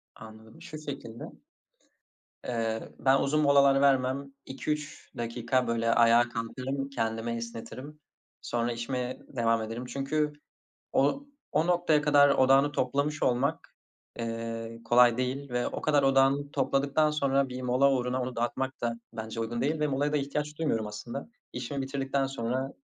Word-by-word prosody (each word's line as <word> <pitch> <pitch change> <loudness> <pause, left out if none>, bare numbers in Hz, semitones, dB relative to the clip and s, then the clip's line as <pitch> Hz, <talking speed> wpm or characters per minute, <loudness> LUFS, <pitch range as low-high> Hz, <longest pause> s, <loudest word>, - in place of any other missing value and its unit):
Anladım. 110 +6 -13
Şu 155 -3 -8
şekilde 135 -6 -7 1.2
eee, 115 -2 -2
ben 135 +1 +4
uzun 150 +2 +1
molalar 140 -1 +5
vermem. 135 0 +2
2-3 150 +3 -5
dakika, 120 +1 -1
böyle, 115 0 +1
ayağa 120 +1 +5
kalkarım, 130 +4 -4
kendimi 115 -2 -2
esnetirim. 115 +5 -7 0.4
Sonra 120 0 -1
işime 125 +1 -3
devam 115 -2 +1
ederim 115 +3 -5
çünkü 150 +3 -1 0.6
o 145 - +1 0.3
o 160 - +2
noktaya 175 -4 +3
kadar 145 -1 +6
odağını 135 +2 +4
toplamış 140 +3 -1
olmak, 140 +5 0 0.4
eee, 115 0 -5
kolay 120 0 +5
değil 130 +2 -3
ve 125 0 0
o - - -5
kadar 145 -2 +3
odağını 135 +1 +3
topladıktan 140 +2 +1
sonra 140 -2 +1
bir 130 0 -6
mola 130 +2 +3
uğruna 125 0 0
onu 125 0 -5
dağıtmak 130 +3 -2
da 115 0 -2
bence 110 +1 -5
uygun 120 +1 -3
değil. 150 +2 0
Ve 150 - +2
molaya 145 +2 0
da - - +2
ihtiyaç 150 +2 -3
duymuyorum 115 -9 0
aslında. 105 - -7 0.2
İşimi 130 +3 -4
bitirdikten 135 0 -1
sonra 130 +1 -3
130 Hz, 140 wpm, -29 LUFS, 115-140 Hz, 1.2 s, kadar